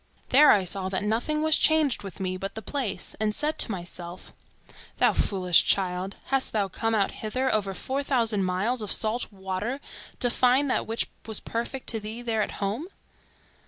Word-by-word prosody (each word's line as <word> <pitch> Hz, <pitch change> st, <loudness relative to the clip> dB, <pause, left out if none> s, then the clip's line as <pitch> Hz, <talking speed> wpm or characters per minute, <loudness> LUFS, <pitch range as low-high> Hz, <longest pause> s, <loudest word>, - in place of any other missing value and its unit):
There 290 Hz, +3 st, +7 dB
I 200 Hz, -, +5 dB
saw 185 Hz, +1 st, -2 dB
that 190 Hz, +1 st, -2 dB
nothing 240 Hz, +9 st, 0 dB
was 315 Hz, 0 st, +5 dB
changed 310 Hz, -5 st, +3 dB
with 195 Hz, -3 st, -9 dB
me 185 Hz, -1 st, -2 dB
but 195 Hz, +1 st, -6 dB
the 220 Hz, -, -6 dB
place, 265 Hz, -5 st, -2 dB
and 215 Hz, -1 st, 0 dB
said 300 Hz, +1 st, 0 dB
to -, -, +1 dB
myself—'Thou 175 Hz, -1 st, -4 dB
foolish 185 Hz, -3 st, +3 dB
child, 185 Hz, 0 st, 0 dB
hast 270 Hz, -1 st, 0 dB
thou 205 Hz, -3 st, +1 dB
come 225 Hz, +4 st, -1 dB
out 200 Hz, -2 st, +1 dB
hither, 255 Hz, +5 st, -2 dB
over 200 Hz, -3 st, -1 dB
four 265 Hz, +8 st, -2 dB
thousand 230 Hz, -7 st, +1 dB
miles 200 Hz, +7 st, 0 dB
of 210 Hz, -, -3 dB
salt 220 Hz, +2 st, +1 dB
water, 195 Hz, +6 st, -4 dB, 0.4 s
to 245 Hz, -, +2 dB
find 255 Hz, +3 st, +3 dB
that -, -, 0 dB
which 225 Hz, +1 st, -1 dB, 0.2 s
was 220 Hz, -2 st, +1 dB
perfect 235 Hz, +3 st, -4 dB
to 225 Hz, -, -1 dB
thee 220 Hz, +3 st, -6 dB
there 225 Hz, -2 st, 0 dB
at -, -, -2 dB
home? 210 Hz, -, -3 dB
215 Hz, 180 wpm, -26 LUFS, 195-255 Hz, 0.4 s, There